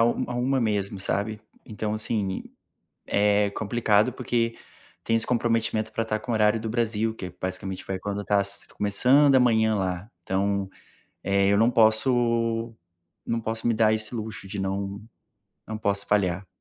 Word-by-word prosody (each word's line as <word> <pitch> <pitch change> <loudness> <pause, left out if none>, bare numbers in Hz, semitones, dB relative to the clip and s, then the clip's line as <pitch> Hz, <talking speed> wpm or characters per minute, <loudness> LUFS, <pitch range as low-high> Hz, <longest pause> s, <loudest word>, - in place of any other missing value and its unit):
a 120 +1 0
13:00 130 +2 +1
mesmo, 100 -3 -1
sabe. 105 +2 -2 0.2
Então, 105 0 -4
assim, 105 -3 -2 0.6
é 105 0 +2
complicado 110 +2 +1
porque 120 -2 -1 0.5
tem 115 - +1
esse 115 - +2
comprometimento 115 -2 0
para 115 - -1
estar 110 -1 -2
com 120 - -7
o - - +1
horário 105 +1 +3
do 110 - -4
Brasil 110 -1 0
que 95 - -6
é, 90 - -9
basicamente, 95 +1 -4
vai 95 -1 -3
quando 100 +1 -4
está 105 0 +1
s 100 0 -4
começando 130 +8 +4
a 130 - +6
manhã 110 -3 +3
lá, 95 +1 -3
então, 100 +1 -1 0.5
eh, 100 0 +2
eu - - +4
não 115 +3 +4
posso 115 0 +2 0.5
não 115 0 -1
posso 110 +1 -3
me 120 - +3
dar 110 0 +3
esse 110 +2 -4
luxo 110 -3 -6
de 100 +1 -6
não 100 +1 -3 0.7
não 110 - -4
posso 100 -1 0
falhar. 95 -2 +1
110 Hz, 165 wpm, -25 LUFS, 100-115 Hz, 0.7 s, a